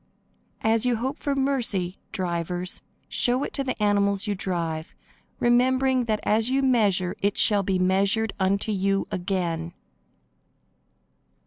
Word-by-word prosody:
As 220 0 +2
you 250 -1 +2
hope 260 +5 -3
for 285 -1 -1
mercy, 240 -10 -1
drivers, 180 -2 -3 0.3
show 250 +3 +2
it - - -5
to 275 - 0
the 255 -3 -3
animals 200 -1 +1
you 205 - -1
drive, 170 -4 -3 0.4
remembering 255 +1 +3
that 215 -2 0
as 220 +3 +2
you 270 +1 +1
measure 205 -8 +2
it 200 0 0
shall 205 -2 +4
be 190 -1 0
measured 195 +4 +1
unto 200 +3 +1
you 195 0 0
again. 175 -2 -2
205 Hz, 130 wpm, -25 LUFS, 185-245 Hz, 0.4 s, shall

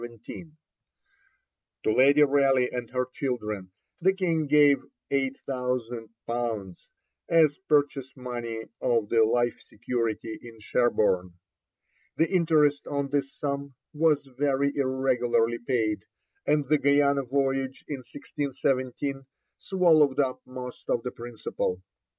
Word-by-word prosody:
To - - +2
Lady 140 +4 +6
Raleigh 135 -3 +3
and 120 -2 -4
her 125 0 -1
children 105 -8 -3 0.3
the 190 +3 +3
King 165 -5 0
gave 145 -1 +5 0.3
8,000_l._ 120 -6 -3 0.5
as 155 -3 +4
purchase 145 -3 +1
money 120 -3 -5 0.2
of 115 -4 +1
the 115 -1 +4
life 120 +2 +1
security 115 -1 -3
in 115 -2 -12
Sherborne. 105 -6 +1 0.8
The 165 - +3
interest 155 -5 +3
on 140 -1 -2
this 140 -1 0
sum 140 -1 -3 0.2
was 150 -2 +2
very 140 0 +1
irregularly 125 -4 +1
paid, 110 -5 -1 0.4
and 150 -2 +2
the 150 +1 +3
Guiana 140 0 +3
voyage 135 0 -1
in 145 - -3
1617 135 0 -3 0.3
swallowed 160 -7 +3
up 130 -2 0
most 125 -1 -8
of 115 - +1
the 125 - -3
principal. 115 -6 -4
130 Hz, 110 wpm, -27 LUFS, 120-145 Hz, 0.8 s, Lady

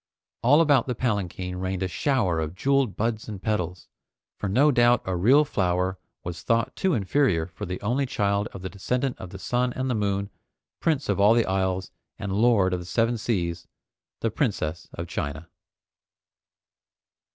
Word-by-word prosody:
All 140 +8 +5
about 145 -7 +4
the 125 - -1
palanquin 95 -6 -2
rained 95 0 -2
a - - 0
shower 105 - +1
of 80 +2 -3
jeweled 135 0 +1
buds 115 0 -1
and 105 -3 -6
petals, 90 -4 -2 0.5
for 100 - -3
no 140 +9 +4
doubt 120 -2 +4
a 95 - -1
real 130 +12 +5
flower 95 -5 0 0.2
was 85 -1 -6
thought 115 0 0
too 190 -5 +1
inferior 100 - +2
for 85 +1 -8
the 90 +1 -4
only 125 +6 0
child 100 -3 0
of 95 - -10
the 95 - -3
Descendant 125 +7 -2
of 90 - -7
the 95 - -8
Sun 125 +5 0
and 130 0 -2
the - - +1
Moon, 100 -2 -1 0.5
Prince 150 -4 0
of 100 -2 0
all 105 +3 +6
the 115 - +3
Isles, 95 -1 -1 0.3
and 100 - -4
Lord 105 -3 +3
of 90 - -1
the 90 - -8
Seven 115 +6 +1
Seas, 90 -7 -2 0.5
the 115 - 0
Princess 90 - -2
of - - -5
China. 75 +4 -4
100 Hz, 175 wpm, -25 LUFS, 90-120 Hz, 0.5 s, all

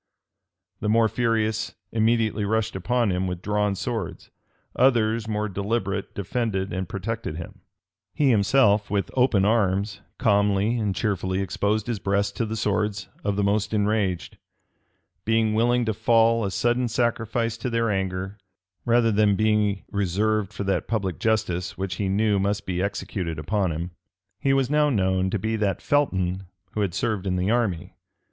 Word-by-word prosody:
The 105 - -1
more 115 +1 +4
furious 110 -2 0 0.2
immediately 110 -1 +1
rushed 110 0 0
upon 115 +3 +1
him 90 +1 -1
with 90 -1 -5
drawn 105 -1 0
swords: 110 -2 -4 0.4
others, 115 -3 +2
more 105 -1 -1
deliberate, 100 0 -2
defended 100 -2 -2
and 95 0 -3
protected 105 -3 -4
him: 85 - -9 0.5
he 140 -3 +2
himself, 105 -1 +3
with 100 -1 -1
open 125 -7 +3
arms, 105 -1 +1 0.2
calmly 105 0 +2
and 105 -3 -1
cheerfully 95 -3 -1
exposed 100 +2 0
his 120 -4 -3
breast 100 +1 0
to 115 - 0
the 110 - -3
swords 105 -2 -1
of 100 -1 0
the 100 - 0
most 105 +2 +1
enraged; 105 -4 0 0.8
being 110 -1 +2
willing 120 +2 +2
to 110 - 0
fall 115 +1 +3
a 100 - 0
sudden 120 +5 +1
sacrifice 115 -1 0
to 120 +2 -3
their 115 -2 +1
anger, 95 +1 -3 0.5
rather 115 -1 +3
than 105 -1 +3
be 105 -2 +1
reserved 100 +1 0
for 100 -1 -5
that 95 0 -1
public 95 -7 -2
justice 100 -4 -1
which 95 0 -3
he 100 -2 -1
knew 105 +1 +2
must 100 +1 -1
be 90 -1 -2
executed 95 -4 -3
upon 95 +4 0
him. 85 +3 -4 0.5
He 135 - +1
was 135 -1 +2
now 150 +1 +3
known 95 -5 +1
to 105 - -1
be 110 +3 -1
that 100 -3 0
Felton 95 -10 0 0.2
who 105 - -2
had 95 -4 -1
served 100 -4 -1
in 90 - 0
the 90 +3 0
army. 110 -8 -1
105 Hz, 160 wpm, -24 LUFS, 95-115 Hz, 0.8 s, more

